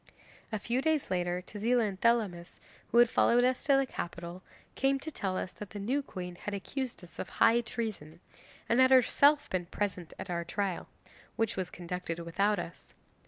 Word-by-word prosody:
'A 215 - 0
few 235 +5 -1
days 310 -6 +1
later 180 0 0
Tezila 230 +4 +1
and 190 -2 -6
Thelamis, 210 -7 +1 0.3
who 235 - 0
had 240 0 +8
followed 240 +1 +4
us 255 0 +1
to 280 -3 +5
the 270 - +3
capital, 175 -5 -6 0.3
came 270 0 +2
to 310 +4 -5
tell 190 -8 -2
us 180 - -4
that 210 - -9
the 205 - -7
new 255 +8 0
queen 180 -9 -7
had 205 +2 -4
accused 250 +3 -4
us 175 - -14
of - - -4
high 230 +1 +4
treason, 210 -9 -5 0.5
and 235 - +3
had 260 0 +7
herself 280 +3 +5
been 180 -2 -1
present 185 -3 -3
at 190 - -6
our 170 -1 -1
trial 190 +1 -2 0.5
which 225 -2 0
was 185 -2 -2
conducted 175 -1 -5
without 195 +5 +1
us. - - -8
205 Hz, 185 wpm, -31 LUFS, 180-245 Hz, 0.5 s, had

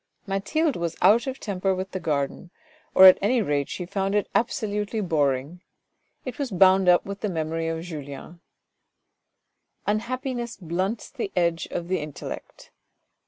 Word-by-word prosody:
Mathilde 255 +11 0
was 170 -1 -3
out 235 +6 +5
of 265 0 -4
temper 195 -2 -1
with 185 0 -5
the 185 - -3
garden, 150 +1 -2 0.5
or 190 - +9
at 185 - +9
any 235 +5 +2
rate 145 -9 0
she 180 - -4
found 195 +2 -1
it 205 - +1
absolutely 210 -1 -1
boring: 150 -2 0 0.6
it 255 - -6
was 280 -3 -1
bound 190 -1 +5
up 175 - +5
with 200 0 -6
the 210 - -1
memory 165 -1 -2
of 165 0 -3
Julien. 155 0 -8 1.4
Unhappiness 240 +3 -2
blunts 185 +5 -3
the 240 -8 -4
edge 170 -1 +1
of 170 - -4
the 185 0 0
intellect. 150 -2 -8
185 Hz, 150 wpm, -25 LUFS, 165-210 Hz, 1.4 s, or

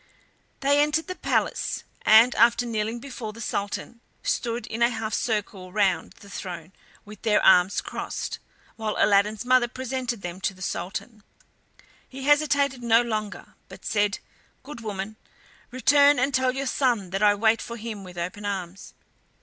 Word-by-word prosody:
They 285 +1 +4
entered 300 +2 +1
the 370 - -5
palace, - - -1 0.2
and, 225 +3 +7
after 235 +1 +4
kneeling 225 0 -2
before 235 -4 -7
the 230 - -12
Sultan, 215 +2 -4 0.2
stood 235 0 -1
in 230 - -6
a 235 - +5
half 220 -2 -4
circle 205 -5 -2
round 200 -1 +1
the 200 - -13
throne 175 -3 -7 0.3
with 210 -1 -12
their 215 -2 +3
arms 180 0 +5
crossed, - - -5 0.4
while 220 -1 -2
Aladdin's 210 +2 +3
mother 250 -1 +4
presented 255 -3 -4
them 175 +1 -6
to 190 - -1
the 185 - -16
Sultan. 195 +6 -5 0.9
He 265 0 -8
hesitated 285 -2 +2
no 235 0 +4
longer, 215 -3 -4 0.2
but - - -13
said: 205 0 +1 0.5
"Good 265 -3 -9
woman, 210 0 -5 0.5
return 285 +3 +5
and 275 +3 +1
tell 260 0 +2
your 275 +1 -2
son 240 -8 0
that 195 +1 -2
I 205 -1 +5
wait 220 +2 +2
for 235 - -7
him 215 -3 -6
with 180 -1 -11
open 180 +4 -4
arms." 195 -2 -5
225 Hz, 160 wpm, -25 LUFS, 200-255 Hz, 0.9 s, and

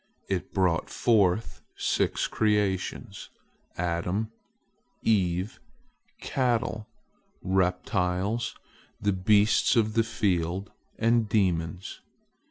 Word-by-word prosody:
It 95 -2 -2
brought 90 -4 +1
forth 110 -2 +2 0.2
six - - 0
creations: 105 -4 -1 0.5
Adam, 90 +5 -1 0.7
Eve, 95 -2 +1 0.6
cattle, 120 -4 -1 0.6
reptiles, 95 +3 0 0.4
the 100 -1 +1
beasts 105 +5 +3
of 110 -2 +2
the 115 0 +3
field, 95 -4 -1 0.3
and 115 -1 +2
demons. 90 -3 -1
100 Hz, 75 wpm, -27 LUFS, 90-110 Hz, 0.7 s, beasts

